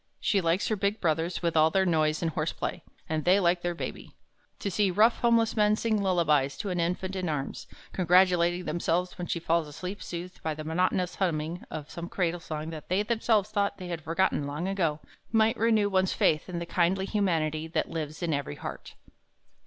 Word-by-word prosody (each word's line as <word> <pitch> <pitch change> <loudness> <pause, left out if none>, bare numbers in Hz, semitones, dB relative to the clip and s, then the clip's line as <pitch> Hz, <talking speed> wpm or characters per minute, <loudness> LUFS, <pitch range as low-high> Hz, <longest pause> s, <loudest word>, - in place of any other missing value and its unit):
She 200 -3 +2
likes 170 +3 +1
her 215 - +1
big 200 +2 -1
brothers 165 +1 0
with 170 -1 0
all 155 0 +5
their 190 +3 +2
noise 155 -2 +1
and 165 - 0
horseplay, 160 +2 -3 0.3
and 155 -1 -1
they 185 +3 +5
like 175 -1 +2
their 175 0 -2
Baby. - - -7 0.4
To 200 - -3
see 200 +1 +2
rough 215 +6 +4
homeless 230 -2 +3
men 210 -1 +4
sing 220 -1 0
lullabies 155 -7 +2
to 200 -4 -3
an 180 - -1
infant 180 +3 -1
in 185 -3 -2
arms, 140 -3 -4 0.3
congratulating 180 -1 +3
themselves 175 +3 -1
when 175 - -3
she 170 - -1
falls 165 -1 +1
asleep 180 +7 -6
soothed 180 +1 -7
by 160 -1 -2
the 155 - -6
monotonous 180 +2 0
humming 170 -2 -1
of 150 -1 -7
some 170 0 -6
cradle 175 -2 -1
song 155 -1 -5
that 155 -2 -9
they 190 +3 +2
themselves 220 -2 +1
thought 200 -1 0
they 180 -2 -7
had 170 -2 -4
forgotten 165 -2 0
long 150 +6 -3
ago, 165 -6 0 0.3
might 225 0 +3
renew 220 -2 +3
one's 190 -1 +1
faith 155 +3 +1
in 175 - -4
the 170 - -3
kindly 180 +3 +1
humanity 160 -7 0
that 165 - -2
lives 155 +1 -4
in 165 -2 0
every 140 - -3
heart. - - -8
175 Hz, 200 wpm, -28 LUFS, 160-195 Hz, 0.4 s, all